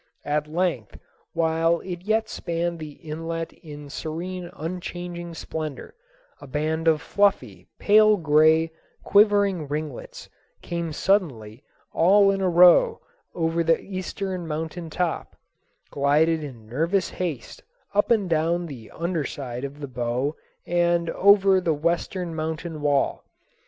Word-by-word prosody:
At 150 +1 0
length 160 - -2 0.4
while 165 +1 +2
it 175 -2 -6
yet 220 +3 0
spanned 170 0 -3
the 155 -2 -7
inlet 165 +1 -5
in 150 -3 -11
serene 175 +5 -5
unchanging 175 -1 -6
splendor, 155 - -6 0.5
a - - -10
band 155 +4 -1
of 155 -2 +3
fluffy, 200 -1 0
pale 215 0 +5
gray, 160 0 +4 0.3
quivering 200 -5 +3
ringlets 150 -2 -6 0.4
came 170 -1 -3
suddenly 135 - 0 0.3
all 195 +4 +5
in 195 0 -2
a 185 - +2
row 180 - +6 0.4
over 165 0 0
the 165 0 +3
eastern 185 -2 -5
mountain 160 +2 -4
top, 175 +1 -2 0.6
glided 155 +3 +2
in 125 -7 -9
nervous 165 - 0
haste 165 -10 -5 0.3
up 205 0 +2
and 220 -5 +3
down 170 +1 +1
the 130 -9 -9
under 170 -2 -2
side 125 -3 -6
of 140 +1 -6
the 140 - -4
bow 125 +4 -2 0.3
and 170 -1 +1
over 195 -1 +5
the 165 -3 +1
western 170 +2 -1
mountain 160 0 -4
wall. 145 -2 +1
165 Hz, 125 wpm, -24 LUFS, 150-180 Hz, 0.6 s, row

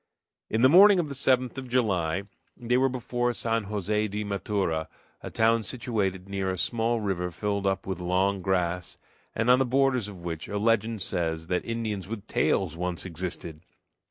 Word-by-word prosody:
In 110 +2 +1
the - - +9
morning 195 +7 +8
of 165 -4 0
the - - -4
7th 130 -2 +1
of 130 -1 -8
July 95 -8 +1 0.3
they 120 0 0
were 135 +1 +3
before 120 -1 -1
San 115 -2 -1
Jose 105 +1 -1
de 105 +1 -3
Matura, 100 -5 -1 0.3
a - - -6
town 115 +1 +3
situated 105 -6 -2
near 95 -1 -2
a 95 - -2
small 115 +4 0
river 95 -4 -2
filled 100 +2 -2
up 95 0 -1
with 95 -2 -4
long 95 +2 +1
grass, 90 -2 -1 0.4
and 115 - 0
on 125 +1 +6
the - - +4
borders 130 -3 +2
of 95 -4 -10
which 80 -3 -5
a 105 - -3
legend 110 -1 +1
says 80 -3 -2
that 90 -1 0
Indians 110 -5 -3
with 105 -1 -6
tails 85 -5 +1
once 90 +1 -3
existed. 85 -2 -5
105 Hz, 180 wpm, -27 LUFS, 90-120 Hz, 0.4 s, the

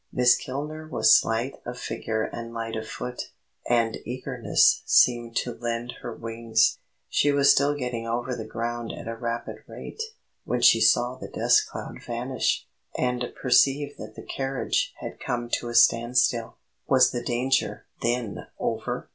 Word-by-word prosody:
Miss 125 -1 +5
Kilner 150 +4 -6
was 110 - +6
slight 115 +4 +1
of 125 +1 -6
figure 110 -2 -3
and 115 +1 -6
light 115 0 -4
of 110 0 -5
foot, 125 +2 -6 0.4
and 115 -2 +2
eagerness 125 0 +2
seemed 120 -1 +3
to 120 - -1
lend 120 +1 -3
her 120 - -5
wings. 115 0 0 0.3
She 145 - +2
was 140 0 +5
still 145 +1 +3
getting 125 -4 -4
over 120 +2 -2
the 110 -2 -6
ground 120 +1 -4
at - - -8
a 115 - -3
rapid 115 0 -4
rate, - - -8 0.4
when 125 - -2
she 115 -1 +6
saw 120 +3 +4
the - - -7
dust - - +3
cloud - - -7
vanish, 125 +2 -1 0.3
and 125 -1 -1
perceived 140 +3 +3
that 110 0 -9
the - - -10
carriage 135 -1 -1
had - - -7
come 120 -1 -3
to 120 - -6
a 120 - -5
stand 120 +1 +4
still. 120 -3 +1 0.3
Was 130 -2 +5
the 120 - -3
danger, 120 -3 0 0.2
then, 120 -3 -2
over? - - -3
120 Hz, 160 wpm, -26 LUFS, 115-125 Hz, 0.4 s, was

